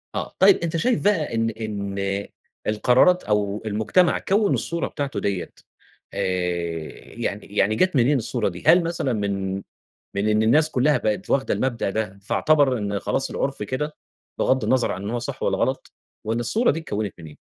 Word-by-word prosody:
آه. - - -4
طيب، 195 +1 +7
أنت 170 -1 -2
شايف 240 +8 +1
بقى 175 - +1
إن 115 0 +1
إن 100 -2 -3 0.4
القرارات 125 +11 +4
أو 105 -1 0
المجتمع 110 - +2
كوّن 205 +1 +2
الصورة 170 0 -1
بتاعته 140 -2 -4
ديّة 100 -3 -2 0.6
آآ 100 - -4 1.0
يعني 105 -3 -3
يعني 105 +1 +1
جات 185 +8 +2
منين 130 +3 +4
الصورة 115 -2 -1
دي؟ 90 0 -10
هل 175 0 +7
مثلًا 165 -7 -1
من 100 -2 -2 0.6
من 100 +2 0
إن 110 0 +3
الناس 150 +8 +4
كُلّها 145 +2 +2
بقت 105 -1 -2
واخدة 135 - +2
المبدأ 120 -6 -1
ده، 100 -2 -3
فاعتبر 140 +3 +2
إن 100 -1 -2
خلاص 135 - -1
العُرف 135 -5 -2
كده، 150 +8 -3 0.4
بِِغَض 130 0 +2
النظر 130 -2 +2
عن 95 - -6
إن 100 - -4
هو 120 - -1
صح 120 - -6
والّا - - +1
غلط - - -1 0.3
وإن 115 +2 -1
الصورة 220 - +2
دي 160 - -2
اتكوّنت 105 - -4
من 80 - -10
إيه؟ 75 - -12
115 Hz, 175 wpm, -23 LUFS, 100-150 Hz, 1.0 s, طيب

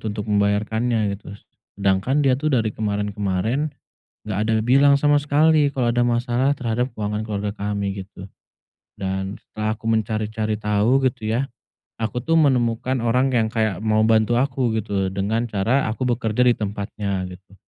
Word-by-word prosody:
gitu 110 - -4
untuk 105 0 -4
membayarkannya 105 +2 +1
gitu. 100 0 -9 0.4
Sedangkan 100 +9 +1
dia 130 -1 +2
tuh 155 - 0
dari 115 -6 +1
kemarin-kemarin 105 +5 -1 0.6
nggak 100 - -2
ada 115 - +1
bilang 135 +5 +5
sama 145 0 +4
sekali 145 0 +3
kalau 125 -3 +1
ada 120 0 +2
masalah 120 +3 +1
terhadap 125 -1 -2
keuangan 105 0 -3
keluarga 105 -1 -3
kami, 100 -1 -2
gitu. 95 -1 -12 0.7
Dan 95 +1 -3
setelah 110 0 -3
aku 115 +1 -6
mencari-cari 110 -1 -1
tahu 105 +5 +2
gitu 110 -4 -4
ya, 130 +4 0 0.5
aku 120 +3 -3
tuh 165 - +1
menemukan 130 -4 +2
orang 125 +3 +2
yang 115 -3 0
kayak 110 -5 0
mau 110 0 +3
bantu 110 +1 +3
aku 130 -4 0
gitu 110 - -18
loh, 95 - +1
dengan 105 +4 -1
cara 115 +5 +1
aku 125 +2 -2
bekerja 115 -1 0
di 125 -1 +4
tempatnya, 100 -2 -3
gitu. 95 +2 -14
110 Hz, 160 wpm, -22 LUFS, 105-125 Hz, 0.7 s, bilang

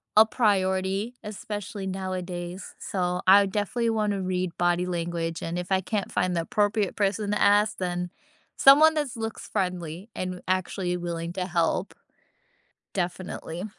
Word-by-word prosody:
a 215 +1 +9
priority, 195 -1 +1
especially 205 -1 -6
nowadays. 185 -1 -5
So, 180 -2 -1
I 200 +1 +8
definitely 210 +4 -1
wanna 210 -3 0
read 185 -1 -2
body 175 0 +2
language, 170 -2 -3
and 170 +2 -3
if 180 - -6
I 190 0 +3
can't 205 +1 -2
find 185 - +1
the 165 - +1
appropriate 205 +2 0
person 205 0 0
to 210 - 0
ask, 205 +1 +4
then 180 -1 -2 0.5
someone 300 +4 +8
that 300 -2 0
looks 225 0 -5
friendly, 180 +1 -3
and 185 -1 -4
actually 185 -1 0
willing 170 -1 -4
to 180 0 -2
help. 175 +1 0 1.0
Definitely. 175 -1 -4
185 Hz, 140 wpm, -26 LUFS, 175-205 Hz, 1.0 s, a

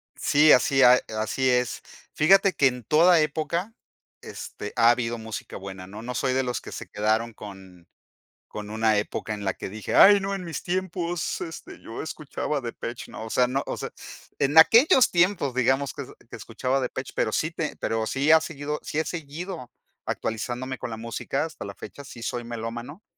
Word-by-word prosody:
Sí, 150 +1 +4
así, 135 +2 +4
a 125 0 +7 0.2
así 130 +4 0
es. 125 -1 +1 0.3
Fíjate 195 +4 +5
que 135 - +4
en 125 -1 -3
toda 165 - +5
época, 160 +7 -1 0.5
este, 105 - -8
ha 115 0 +5
habido 120 -1 +1
música 110 -1 -7
buena, 95 -1 -8
¿no? 105 +2 -9
No 125 +2 -6
soy 130 +1 0
de 130 0 +1
los 125 -1 -2
que - - -10
se - - -7
quedaron 110 +3 0
con 95 -4 -12 0.6
con 105 -1 -7
una 110 0 +2
época 105 +1 -3
en 105 -1 -6
la 95 - 0
que - - -7
dije, 105 +2 -6
ay 205 0 +8
no, 195 +1 -2
en 195 -2 -4
mis 165 - -5
tiempos, 175 -2 -2
este, 165 -2 -8
yo 115 - -7
escuchaba 150 -2 -4
Depeche, 120 0 -6
¿no? 110 - -7
O - - -8
sea, 125 - +3
no, 135 +3 -1
o - - -2
sea, - - -6 0.5
en 140 +3 +1
aquellos 245 - +7
tiempos 175 -6 +2
digamos 130 +2 +1
que 140 - -6 0.2
que - - -8
escuchaba 130 +4 -2
Depeche 130 0 -4
pero 110 - 0
sí 155 - 0
te 165 -2 -4
pero 110 0 -1
sí 140 +4 +2
ha 160 - +8
seguido 150 -1 -5
sí 155 - -2
he 160 - 0
seguido 165 -2 -6 0.4
actualizándome 125 +4 -3
con - - -6
la 110 - -5
música 115 +5 -3
hasta 160 -9 -7
la 100 -1 -8
fecha 140 - -10
sí 120 -4 -10
soy 120 +1 -3
melómano, 120 - -6
130 Hz, 190 wpm, -25 LUFS, 115-160 Hz, 0.6 s, ay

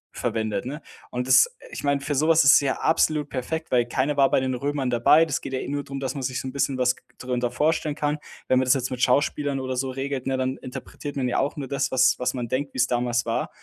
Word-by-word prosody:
verwendet, 110 0 -2
ne? 145 +5 -6 0.3
Und 125 0 -3
das 445 - +6 0.2
ich - - -7
meine, 140 -1 +1
für 145 - -2
sowas 160 +3 +4
ist 135 - +7
es - - +7
ja 140 -2 0
absolut 155 -2 +1
perfekt, 160 +5 -4
weil 120 -2 +3
keiner 135 +4 0
war 135 -1 +5
bei - - +3
den 130 0 -1
Römern 135 0 -2
dabei. 125 +7 +5
Das 150 -4 -2
geht - - -7
ja 130 - -3
nur 145 0 -2
drum, 135 0 -6
dass 135 -1 -3
man 140 - -4
sich 130 0 -2
so - - -6
'n - - -4
bisschen 140 -1 0
was 125 0 +2
g - - -20
g - - -31
drunter 125 -1 -2
vorstellen 155 -1 0
kann. 150 +1 -1 0.3
Wenn 130 - +3
man 130 - +1
das 125 - +4
jetzt 130 -1 -2
mit 125 -1 -4
Schauspielern 140 +2 +1
oder 130 -1 -3
so 130 +1 -1
regelt, 135 0 -4
ne, 135 -1 0
dann 130 0 -1
interpretiert 145 +3 -8
man 130 -2 -1
ja - - 0
auch 140 - -1
nur 140 -2 -4
das, 140 -1 0
was 130 0 +3
was 125 - 0
man 120 -2 -3
denkt, 135 +3 -2
wie's 130 0 +3
damals 120 -1 0
war. 115 - -1
135 Hz, 270 wpm, -24 LUFS, 125-145 Hz, 0.3 s, ist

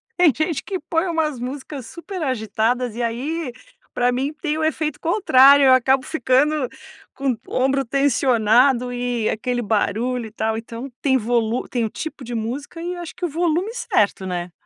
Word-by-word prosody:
tem 350 -4 +5
gente 310 -2 -1
que 380 -3 -4
põe 325 +3 -1
umas 310 -6 -1
músicas 265 0 -6
super 360 +1 -7
agitadas 240 -2 -1
e 240 - -3
aí 260 +5 -2 0.4
pra 245 0 +2
mim 265 +4 -1
tem 305 -2 -1
o - - -1
efeito 310 -1 -1
contrário. 285 -7 +6
Eu 260 - +7
acabo 260 +1 +3
ficando 280 0 +1 0.5
com 275 -1 0 0.2
o - - -7
ombro 270 +1 +2
tensionado 250 -1 +3
e 245 -2 -1
aquele 245 +2 -1
barulho 225 +3 0
e 215 - -13
tal. 220 0 -1
Então 230 +3 -7
tem 265 -2 +3
volu 235 0 0
tem 240 -2 -1
o 220 - -1
tipo 295 +2 -7
de 240 0 -5
música, 260 +9 -4
e 350 +1 -3
eu 350 - -7
acho 340 - -8
que 365 - -3
o 345 - -2
volume 345 +7 0
certo, 210 - 0
né? 175 -1 -4
260 Hz, 180 wpm, -21 LUFS, 235-310 Hz, 0.5 s, Eu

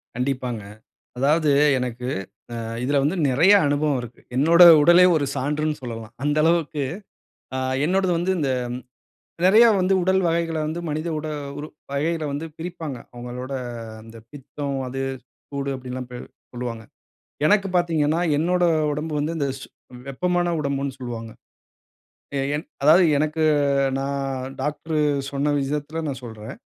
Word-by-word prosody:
கண்டிப்பாங்க. 125 -2 -2 0.6
அதாவது 150 +3 +3 0.3
எனக்கு 125 0 -4 0.5
அ - - -4 0.3
இதுல 140 +3 +1
வந்து 155 +6 +1
நெறைய 155 +10 +5
அனுபவம் 145 0 +1
இருக்கு. 120 0 -11 0.2
என்னோட 165 +6 +6 0.2
உடலே 175 +3 +7
ஒரு 145 -2 +1
சான்றுன்னு 150 +2 -1
சொல்லலாம், 115 -3 -7
அந்த 145 +1 +1
அளவுக்கு. 160 -3 +1 0.7
அ - - -1 0.3
என்னோடது 190 +1 +1
வந்து 180 +3 0
இந்த 140 -4 0 0.9
நெறைய 215 +5 +7
வந்து 185 +1 +2
உடல் 190 +1 +2
வகைகள 165 -1 0
வந்து 160 +2 -3
மனித 155 +3 -2
உட 155 - -5 0.3
உறு 150 - -6 0.3
வகைகளை 155 +3 -1
வந்து 145 +3 -4
பிரிப்பாங்க. 165 -5 -6 0.2
அவங்களோட 125 +2 -6 0.5
அந்த 115 +1 -13
பித்தம், 140 0 -5
அது, 135 +1 -4 0.5
சூடு, 140 -1 -3
அப்படின்ல்லாம் 130 -1 -6
பி 125 - -6 0.4
சொல்லுவாங்க. 120 -2 -5 0.6
எனக்கு 200 +1 +3
பார்த்தீங்கன்னா, 165 -3 +2 0.2
என்னோட 180 +3 +1 0.3
உடம்பு 150 +2 -3
வந்து 155 +3 -2
இந்த 140 - 0
சூ - - -10 0.4
வெப்பமான 175 +5 0
உடம்புன்னு 140 -2 -2
சொல்வாங்க. 115 -3 -6 1.1
எ - - 0 0.2
என் 150 - -4 0.2
அதாவது 165 +5 +7
எனக்கு 155 +2 0 0.6
நான் 135 -1 -3
டாக்டர் 155 +2 -2 0.3
சொன்ன 145 +1 0
விஷயத்தில 150 +3 -3
நான் 135 -2 -4
சொல்றேன். 110 -2 -8
145 Hz, 135 wpm, -23 LUFS, 130-165 Hz, 1.1 s, உடலே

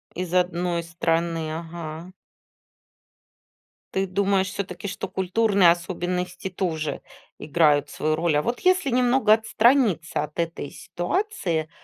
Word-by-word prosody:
Из 180 -1 -4
одной 175 -1 +1
страны, 165 -1 -1
ага. 165 +1 -7 1.8
Ты 190 0 +1
думаешь 195 0 +1
всё-таки, 185 -1 -5
что 195 0 -4
культурные 190 0 +3
особенности 180 +1 -3
тоже 165 -5 -3 0.4
играют 150 -1 +2
свою 155 0 -1
роль? 165 -1 +1
А - - +2
вот 240 +8 -2
если 370 -6 +3
немного 250 -2 +4
отстраниться 220 - +2
от 150 +2 -8
этой 165 -4 -3
ситуации, 175 - -2
180 Hz, 110 wpm, -24 LUFS, 165-200 Hz, 1.8 s, немного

